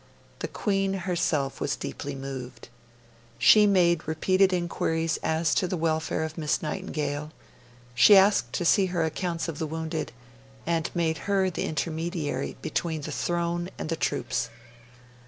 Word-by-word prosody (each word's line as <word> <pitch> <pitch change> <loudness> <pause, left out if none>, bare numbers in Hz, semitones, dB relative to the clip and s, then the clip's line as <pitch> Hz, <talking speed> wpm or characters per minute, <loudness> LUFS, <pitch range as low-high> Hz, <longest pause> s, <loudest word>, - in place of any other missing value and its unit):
The - - -3
Queen 195 -2 0
herself 175 -7 -1
was 145 - 0
deeply 145 -1 -6
moved. 130 -3 -7 0.7
She 210 - +7
made 175 -4 +3
repeated 185 +4 +3
inquiries 165 -2 -1
as 160 0 +1
to 185 - +1
the 180 - -2
welfare 160 -1 0
of 160 +1 -5
Miss 150 -2 0
Nightingale; 150 -3 -3 0.6
she 165 - +8
asked 190 - +4
to 175 - -1
see 195 +2 +4
her 175 -3 0
accounts 170 +1 -2
of 160 -3 -5
the 160 - -2
wounded, 160 0 -4 0.5
and 165 -1 0
made 165 -2 0
her 190 -2 +2
the - - -3
intermediary 160 0 -3
between 160 -3 -2
the - - -5
throne 175 0 -1
and - - -5
the 165 - 0
troops. 115 - -1
165 Hz, 145 wpm, -27 LUFS, 155-180 Hz, 0.7 s, she